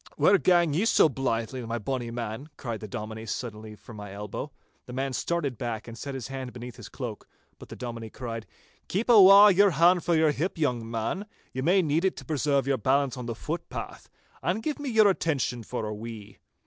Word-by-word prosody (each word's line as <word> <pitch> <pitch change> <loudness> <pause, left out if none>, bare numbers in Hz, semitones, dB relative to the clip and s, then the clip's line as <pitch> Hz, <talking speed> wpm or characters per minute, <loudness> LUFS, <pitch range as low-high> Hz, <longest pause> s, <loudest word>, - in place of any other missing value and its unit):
'Where 200 0 +5
gang 175 -4 +3
ye 180 +9 +1
so 230 - +5
blythe, 115 -4 -2
my 120 -2 -3
bonny 120 +1 -3
man?' 115 +4 -5
cried 115 -4 -4
the 110 - -7
Dominie 110 0 -6
suddenly 110 -1 -5
from 110 +1 -13
my 105 -1 -8
elbow. 105 +1 -6 0.4
The 125 - -8
man 135 +1 -2
started 140 -2 -2
back, 115 -2 -4
and 115 - -8
set 140 +3 -6
his 130 -3 -6
hand 130 -2 -6
beneath 125 0 -8
his 120 - -10
cloak, 120 -6 -6 0.3
but - - -12
the - - -8
Dominie 115 -2 -6
cried,— 115 -2 -6 0.4
'Keep 220 +6 0
awa' 200 -1 +9
your 200 +2 +5
hand 175 +2 +4
frae 170 -2 +2
your 155 -1 +4
hip, 170 +6 -2
young 125 -7 -1
man—ye 130 - -5
may 180 +6 +3
need 155 +2 +1
it 190 - +1
to - - -9
preserve 145 -3 +1
your 135 -1 +1
balance 135 +3 +2
on 125 -2 -6
the 115 - -3
footpath—and 175 - -5
give 300 -2 -2
me 290 -2 -3
your 220 -3 +5
attention 145 -10 0
for 115 0 -4
a 105 - -3
wee. 105 -2 -9
130 Hz, 200 wpm, -27 LUFS, 115-170 Hz, 0.4 s, awa